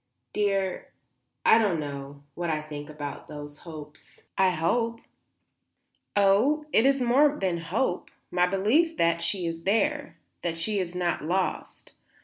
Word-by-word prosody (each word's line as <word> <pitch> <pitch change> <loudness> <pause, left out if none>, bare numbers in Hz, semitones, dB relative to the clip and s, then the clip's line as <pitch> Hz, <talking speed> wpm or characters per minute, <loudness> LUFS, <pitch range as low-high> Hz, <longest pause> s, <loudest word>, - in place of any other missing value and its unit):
"Dear 195 -2 -1 0.5
I 225 - +7
don't 200 -7 +1
know 140 -1 -6
what 175 +2 -3
I 155 -1 0
think 150 -1 -8
about 150 -2 -7
those 145 -1 -9
hopes. 155 -2 -12
I 190 -1 +4
hope." 230 +8 0 1.2
"Oh, 210 +10 +3
it 230 - +5
is 275 -2 +2
more 280 +5 +4
than 180 -3 -1
hope, 180 +4 -1 0.2
my 180 0 +3
belief 245 - +2
that 170 0 +2
she 180 +1 -1
is 165 0 -3
there; 290 - 0 0.2
that 165 -1 -2
she 205 +5 0
is 180 -1 -3
not 175 -3 -1
lost. 180 +4 -2
180 Hz, 140 wpm, -27 LUFS, 160-225 Hz, 1.2 s, I